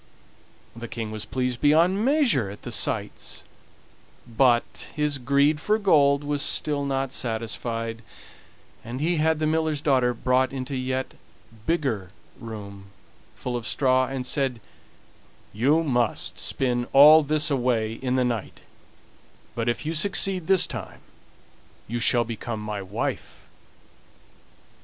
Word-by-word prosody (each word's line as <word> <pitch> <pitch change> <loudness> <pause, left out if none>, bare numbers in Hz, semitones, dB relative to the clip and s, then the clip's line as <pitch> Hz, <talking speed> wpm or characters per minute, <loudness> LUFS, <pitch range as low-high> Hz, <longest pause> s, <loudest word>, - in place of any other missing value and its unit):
The 120 0 -7
King 110 -2 -5
was 110 -1 -4
pleased 125 0 -2
beyond 170 +7 +4
measure 255 - +2
at 100 - -11
the - - -6
sights - - -2 0.8
but 120 +1 +1
his 150 -2 0
greed 140 +4 +2
for 215 +4 +2
gold 145 -8 +3
was 145 -1 -2
still 145 -1 -1
not 135 -1 -1
satisfied, 115 -1 -3 0.8
and 120 +3 -6
he 165 +3 0
had 160 +1 +2
the 155 - -1
miller's 155 -1 0
daughter 130 -4 +2
brought 130 +2 +1
into 135 +1 -5
a - - -1
yet 130 +1 -3 0.5
bigger 130 - -1 0.3
room 100 -4 -9 0.5
full 125 - -4
of 120 -1 -4
straw, 130 -1 +2
and 130 -1 -4
said: 130 -3 -1 0.9
"You 140 +10 +2
must 120 -7 0
spin 120 -2 -1
all 150 +3 +9
this 150 +1 +1
away 120 -4 0
in 125 +2 -2
the 130 -1 +2
night; 115 -4 -4 0.9
but 115 0 -1
if 120 - -2
you 160 - -2
succeed 185 +1 0
this 190 -1 +5
time - - -8 0.9
you 120 +2 -3
shall 120 0 +3
become 115 -1 -5
my 105 -1 -4
wife." 95 - -4
130 Hz, 135 wpm, -25 LUFS, 120-150 Hz, 0.9 s, all